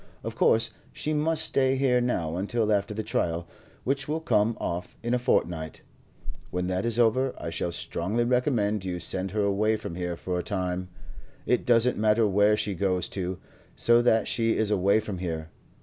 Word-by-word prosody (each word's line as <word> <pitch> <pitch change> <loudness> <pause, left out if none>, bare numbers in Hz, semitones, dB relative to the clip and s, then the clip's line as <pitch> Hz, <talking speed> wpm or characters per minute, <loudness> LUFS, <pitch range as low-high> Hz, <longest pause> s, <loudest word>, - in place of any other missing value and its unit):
Of - - -5
course 115 +1 +3 0.2
she 155 - -2
must 155 +1 +2
stay 130 -1 +2
here 130 -2 +2
now 85 -10 -1
until 105 +3 0
after 100 0 0
the 110 +1 -3
trial, 85 -6 -1 0.4
which 135 +1 -1
will 155 +2 -1
come 115 -6 +1
off 90 +1 -4
in 120 +1 -1
a 125 - +2
fortnight. 85 -9 -1 0.7
When 90 0 -2
that 95 +4 -1
is 115 -1 +1
over, 125 +3 +2
I 85 - -5
should 85 +1 -2
strongly 95 +6 -1
recommend 120 -5 +1
you 90 -1 -3
to - - -5
send 95 +3 -3
her 105 +2 -1
away 105 +2 +2
from 95 - -6
here 90 -1 -3
for 90 -1 -3
a - - -3
time; 90 -2 -3 0.6
it 125 - +1
doesn't 120 0 +3
matter 110 +1 +3
where 105 +2 +3
she 105 - -1
goes 90 -1 0
to, 95 -1 -3 0.4
so 120 0 +4
that 115 -3 +3
she 115 -1 +1
is 110 -1 +1
away 100 +1 +3
from 100 -4 -5
here. 80 -3 -4
105 Hz, 190 wpm, -27 LUFS, 90-120 Hz, 0.7 s, so